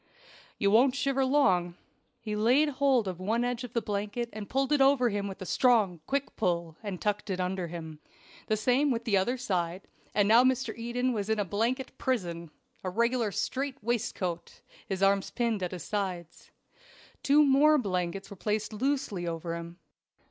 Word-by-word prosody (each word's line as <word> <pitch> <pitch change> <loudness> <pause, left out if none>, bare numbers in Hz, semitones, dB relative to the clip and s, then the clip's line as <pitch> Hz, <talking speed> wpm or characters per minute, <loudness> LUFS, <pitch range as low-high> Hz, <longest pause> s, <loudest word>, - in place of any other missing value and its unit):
"You 200 - +2
won't 250 +4 +5
shiver 275 -1 +1
long." 190 -11 +2 0.4
He 215 -2 -4
laid 250 +8 +3
hold 265 -5 +2
of 180 -2 -4
one 220 +6 0
edge 245 0 -2
of 245 -2 -8
the 235 - 0
blanket 210 +4 -3
and 210 -1 -7
pulled 270 +2 0
it 295 -2 +3
over 270 -3 +4
him 200 -1 -2
with 195 -1 -7
a - - -7
strong, 210 -5 +3
quick 280 0 -2
pull, 170 -5 -1
and 200 -5 -5
tucked 210 0 -2
it 185 -1 -2
under 185 -1 -2
him. 160 -2 -8 0.5
The 215 - +1
same 255 +6 +2
with 235 -3 -1
the 215 -4 +2
other 235 +7 +1
side; 185 -6 -2 0.3
and 205 -1 +3
now 230 +3 +7
Mr. 255 -3 +1
Eden 245 +2 -1
was 205 -2 -3
in 220 - +2
a 205 - 0
blanket 235 +8 -2
prison 175 -10 -2 0.3
a 185 - -2
regular 235 +2 +1
strait 270 +6 -2
waistcoat 190 -7 -3 0.3
his 195 0 -1
arms 195 0 +3
pinned 235 -3 -1
to 180 - -1
his 175 -2 -7
sides. 185 -5 -4 0.7
Two 295 +2 +5
more 290 +3 +5
blankets 190 -4 -2
were - - -7
placed 210 +2 -2
loosely 215 -7 -1
over 165 0 -3
him. 170 +1 -8
215 Hz, 180 wpm, -29 LUFS, 185-250 Hz, 0.7 s, now